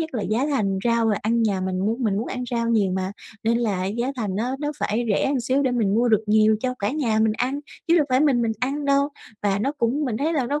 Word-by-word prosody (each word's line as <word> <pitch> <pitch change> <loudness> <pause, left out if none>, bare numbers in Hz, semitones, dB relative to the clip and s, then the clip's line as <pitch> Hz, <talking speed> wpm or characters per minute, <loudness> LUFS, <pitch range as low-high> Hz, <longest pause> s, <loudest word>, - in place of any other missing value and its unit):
nhất 320 0 -3
là 215 - -1
giá 230 +8 0
thành 200 -10 0
rau 230 -1 +2
rồi 210 -2 +2
ăn 230 +2 +1
nhà 200 -4 +1
mình 185 0 -2
muốn 225 +6 -1
mình 200 -2 +1
muốn 225 - -2
ăn 250 -1 -4
rau 235 -1 0
nhiều 205 -5 +2
mà, 190 +1 -2 0.3
nên 230 +1 +2
là 200 -6 -1
giá 240 +7 -2
thành 205 -5 -2
nó 250 +5 -1
nó 295 0 -2
phải 230 +3 -1
rẻ 200 - +2
một 275 -2 +1
xíu 260 +4 +1
để 260 - +1
mình 215 -5 +1
mua 235 +2 +3
được 220 -1 +3
nhiều 215 0 +4
cho 255 -1 -1
cả 205 +2 -1
nhà 245 -7 0
mình 220 0 +3
ăn, 260 +6 -2 0.3
chứ 335 - +5
đâu 300 -3 +3
phải 255 +1 +3
mình 265 -6 +3
mình 225 -1 0
ăn 280 +3 -1
đâu. 280 0 +3 0.3
Và 200 -1 +1
nó 275 +7 0
cũng 280 +2 0
mình 230 -5 -2
thấy 305 +6 0
là 275 -6 0
nó 290 +3 -1
235 Hz, 285 wpm, -23 LUFS, 215-270 Hz, 0.3 s, chứ